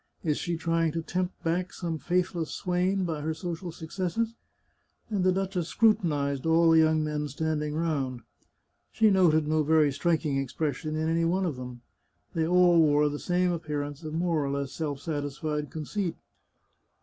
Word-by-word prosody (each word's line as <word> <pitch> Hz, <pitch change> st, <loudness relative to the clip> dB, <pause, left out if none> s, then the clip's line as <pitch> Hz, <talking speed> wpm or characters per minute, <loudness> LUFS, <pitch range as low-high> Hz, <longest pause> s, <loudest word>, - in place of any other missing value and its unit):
Is 150 Hz, -3 st, 0 dB
she 170 Hz, -1 st, -2 dB
trying 165 Hz, -1 st, 0 dB
to 165 Hz, -, -2 dB
tempt 180 Hz, +2 st, -3 dB
back 180 Hz, +2 st, -1 dB
some 165 Hz, -3 st, -4 dB
faithless 175 Hz, -2 st, -1 dB
swain 185 Hz, +1 st, 0 dB
by 160 Hz, -3 st, -3 dB
her 160 Hz, +1 st, -2 dB
social 170 Hz, +1 st, -5 dB
successes? 185 Hz, +7 st, -3 dB, 0.4 s
" -, -, -44 dB
And 200 Hz, -3 st, 0 dB
the 185 Hz, -, +4 dB
duchess 190 Hz, -2 st, -1 dB
scrutinized 150 Hz, -, +1 dB
all 165 Hz, 0 st, +5 dB
the 165 Hz, -, +6 dB
young 155 Hz, -1 st, +3 dB
men 150 Hz, -1 st, -2 dB
standing 150 Hz, +1 st, -2 dB
round. 140 Hz, -7 st, -1 dB, 0.7 s
She 220 Hz, -2 st, +4 dB
noted 160 Hz, -5 st, +4 dB
no 155 Hz, 0 st, +2 dB
very 155 Hz, -1 st, +4 dB
striking 155 Hz, -1 st, 0 dB
expression 150 Hz, +2 st, -2 dB
in 160 Hz, 0 st, -1 dB
any 165 Hz, +1 st, +1 dB
one 185 Hz, +3 st, +1 dB
of 160 Hz, -6 st, -2 dB
them. 125 Hz, -1 st, -8 dB, 0.5 s
They 160 Hz, -2 st, 0 dB
all 175 Hz, -1 st, +5 dB
wore 150 Hz, -1 st, +4 dB
the 145 Hz, 0 st, -5 dB
same 180 Hz, 0 st, +1 dB
appearance 150 Hz, -3 st, -4 dB
of 155 Hz, 0 st, -5 dB
more 165 Hz, -3 st, +1 dB
or 140 Hz, -, -2 dB
less 140 Hz, -1 st, -2 dB
self 145 Hz, -4 st, -3 dB
sat 150 Hz, -3 st, -2 dB
isfied 150 Hz, +1 st, -3 dB
conceit. 170 Hz, +4 st, -3 dB
160 Hz, 175 wpm, -28 LUFS, 150-175 Hz, 0.7 s, the